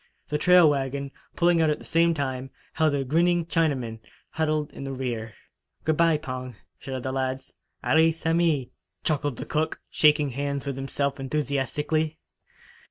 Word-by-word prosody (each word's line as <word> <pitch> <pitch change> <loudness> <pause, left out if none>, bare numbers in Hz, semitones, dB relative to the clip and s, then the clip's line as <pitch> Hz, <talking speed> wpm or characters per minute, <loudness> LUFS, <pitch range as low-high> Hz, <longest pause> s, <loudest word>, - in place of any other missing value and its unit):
The 150 - 0
trail 180 0 +7
wagon, 140 -1 -1 0.2
pulling 170 -1 +3
out 160 - +3
at 150 - +1
the - - -14
same 165 0 +3
time, 135 -2 -3 0.2
held 155 -2 +2
a 140 - 0
grinning 170 +5 +2
Chinaman, 140 -10 0 0.3
huddled 155 -1 -1
in - - -7
the 135 - -4
rear. 120 -5 -4 0.5
"Good 155 0 +1
bye, 165 -2 +4
Pong!" 130 -4 -6 0.2
shouted 130 -2 -5
the 130 - -2
lads. 130 0 -3 0.3
"Allee 160 +1 +4
samee," 165 -4 +1 0.3
chuckled 145 -4 0
the - - -5
cook, 155 +1 -1
shaking 150 -2 +4
hands 140 +2 -3
with 140 -2 -3
himself 140 +1 -2
enthusiastically. 150 +3 -1
145 Hz, 155 wpm, -26 LUFS, 135-160 Hz, 0.5 s, trail